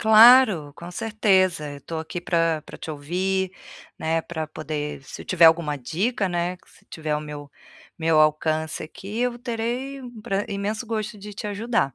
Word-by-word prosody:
Claro, 220 - +7
com 170 +3 -9
certeza, 185 -6 +2
eu 140 - -10
tô 160 +3 -5
aqui 160 +2 -5
pra 165 -3 +1
pra - - -11
te - - -6
ouvir, 185 +6 -1 0.5
né, 165 +1 0
pra 160 -2 -4
poder 150 -2 -5
Se - - -9
tiver 175 -2 +4
alguma 160 -2 +5
dica, 190 - -1
né, 175 +1 -1
que - - -26
se - - -22
tiver 155 -2 -6
ao 150 - +1
meu 145 -1 -8 0.5
meu 160 -1 +3
alcance 155 +1 +1
aqui, 195 +7 -7
eu 245 -1 0
terei 245 +3 -3
um 245 -3 -10
pra 195 0 -1
imenso 210 +3 -3
gosto 215 -1 -3
de 205 +1 -9
te 210 - -5
ajudar. 210 - 0
175 Hz, 175 wpm, -24 LUFS, 155-215 Hz, 0.5 s, Claro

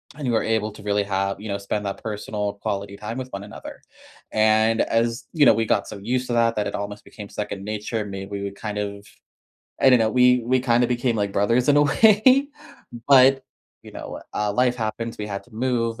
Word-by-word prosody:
and 150 - -6
you 120 - +1
were 110 - +2
able 110 -1 0
to - - -13
really 105 0 +1
have 100 0 -2
you 110 - -7
know, 100 - -1
spend 100 +1 -4
that 100 - -5
personal, 105 -1 -3
quality 100 0 -4
time 110 +4 -6
with 130 0 -5
one 100 0 -6
another. 105 - -10 0.5
And 110 +1 +3
as 115 +2 0
you 150 -4 +4
know, - - +7
we 115 0 0
got 105 -2 0
so - - -8
used 125 +5 -2
to 120 - -2
that 115 -1 +2
that 105 -1 -1
it - - -4
almost 100 +1 -6
became 105 -2 -11
second 100 -1 -5
nature, 105 +1 -3
may 95 -1 -6
we 100 -1 -5
would 100 0 -4
kind 105 -1 -5
of 100 0 -5 0.8
I - - +6
don't 125 - +6
know, 110 -1 +2
we 125 0 +4
we 130 +2 +2
kinda 120 -1 +2
became 120 -1 0
like 100 -2 -1
brothers 115 +7 +1
in 145 - +5
a 145 - +6
way, 220 - +4 0.6
but, 135 -1 +6 0.4
you - - -13
know, - - -8
uh, 105 -1 -1
life 125 +1 +1
happens, 115 0 -4
we 105 - -4
had 100 -1 -5
to 125 - -20
move, 115 -1 -1
110 Hz, 225 wpm, -23 LUFS, 105-125 Hz, 0.8 s, know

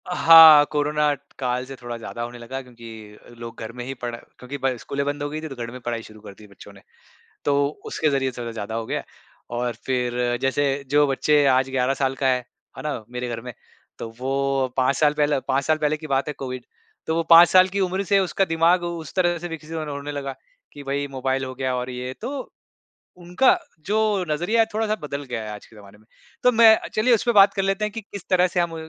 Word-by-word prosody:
अ, 180 - -4
हाँ, 160 -3 +9
कोरोना 150 0 +1 0.3
काल 125 -1 -1
से 135 +1 -9
थोड़ा 120 -1 -6
ज़्यादा 115 +1 -7
होने 120 +1 -6
लगा 125 +3 -6
क्योंकि 115 -3 -13
लोग 115 -1 -9
घर 110 - -6
में 120 +1 -8
ही 135 - -5
पढ़ 120 -2 -6
क्योंकि 125 +3 -10
पढ़ 135 -1 -1
स्कूलें 140 +4 -4
बंद 145 0 -3
हो 145 - -3
गई 155 +1 -5
थीं 160 - -6
तो 135 - -8
घर 120 -1 -6
में 125 - -9
पढ़ाई 120 -1 -3
शुरू 110 0 -14
कर 105 - -11
दी 105 +2 -16
बच्चों 100 0 -15
ने। 100 - -17 0.6
तो 145 - +2 0.3
उसके 155 - 0
ज़रिए 135 -1 0
थोड़ा 120 -1 -5
ज़्यादा 110 -1 -6
हो 115 0 -3
गया - - -3 0.5
और 120 0 -1
फ़िर 125 -1 -1
जैसे 135 +2 +1 0.2
जो 145 0 +4
बच्चे 145 +2 +2
आज 130 +1 0
11 130 0 +1
साल 135 -1 -1
का 135 - -1
है, 130 -1 +3 0.4
है - - -6
ना? 145 -7 -4
मेरे 125 0 -4
घर 115 -1 -4
में 125 +1 -8 0.5
तो - - -6
वो 135 0 0
5 130 +1 +2
साल 150 0 +3
पहले 145 -2 +1
5 135 +1 +1
साल 155 0 +1
पहले 150 0 0
की 155 - -9
बात 135 0 0
है 150 - -4
कोविड। 130 -2 -6 0.4
तो 160 - 0
वो 165 - +1
5 170 +1 +9
साल 185 0 +6
की 195 +2 -3
उम्र 190 +1 0
से 200 +1 +3
उसका 195 +1 0
दिमाग 165 +1 +2
उस 170 -3 -6
तरह 175 -2 +1
से 175 +2 -6
विकसित 160 -1 -9
होन 155 -1 -4
होने 145 0 -5
लगा 140 -2 -5 0.4
कि 145 - -10
भई 140 +1 -2
मोबाइल 130 0 -2
हो 130 0 -7
गया 130 0 -2
और 125 +1 -4
ये 125 0 -5
तो 265 +4 -6 0.7
उनका 180 - +2 0.3
जो 210 +3 +1 0.3
नज़रिया 175 +10 0
है - - +3
थोड़ा-सा 215 0 0
बदल 145 -1 -5
गया 120 -2 -3
है 110 - -7
आज 105 - -9
के - - -20
ज़माने 100 -1 -15
में। 110 - -25 0.4
तो 250 - +5
मैं 225 -2 +7 0.2
चलिए 235 +3 +3
उसपे 235 +2 0
बात 200 -2 +6
कर 195 - -1
लेते 195 +2 0
हैं 210 - -4
कि 225 - -6
किस 200 -2 -11
तरह 185 -1 +4
से 180 0 -2
हम 170 -1 -1
140 Hz, 235 wpm, -23 LUFS, 125-165 Hz, 0.7 s, हाँ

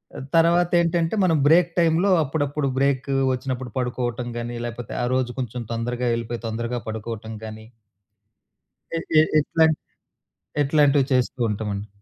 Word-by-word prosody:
ఆ! - - -6 0.2
తర్వాత 170 +1 +4
ఏంటంటే 170 +2 0
మనం 165 -3 +3
బ్రేక్ 170 +2 +5
టైంలో 170 +4 +3
అప్పుడప్పుడు 145 0 -1
బ్రేకు 135 0 +1 0.2
వచ్చినప్పుడు 130 -1 -4
పడుకోవటం 125 -1 -2
గాని, 120 0 -5
లేకపోతే 120 -1 -7
ఆ - - +1
రోజు 125 -1 -1
కొంచెం 125 0 -5
తొందరగా 120 +2 -2
ఎళ్ళిపోయి, 115 0 -5
తొందరగా 115 +2 -3
పడుకోవటం 110 0 -6
గాని. 110 0 -9 1.3
ఎ - - 0 0.2
ఎ - - +8 0.2
ఎట్లాం 160 +2 +3 0.9
ఎట్లాంటివి 145 -1 +3
చేస్తూ 125 +1 0
ఉంటామండి. 105 -1 -3
125 Hz, 130 wpm, -23 LUFS, 120-155 Hz, 1.3 s, ఎ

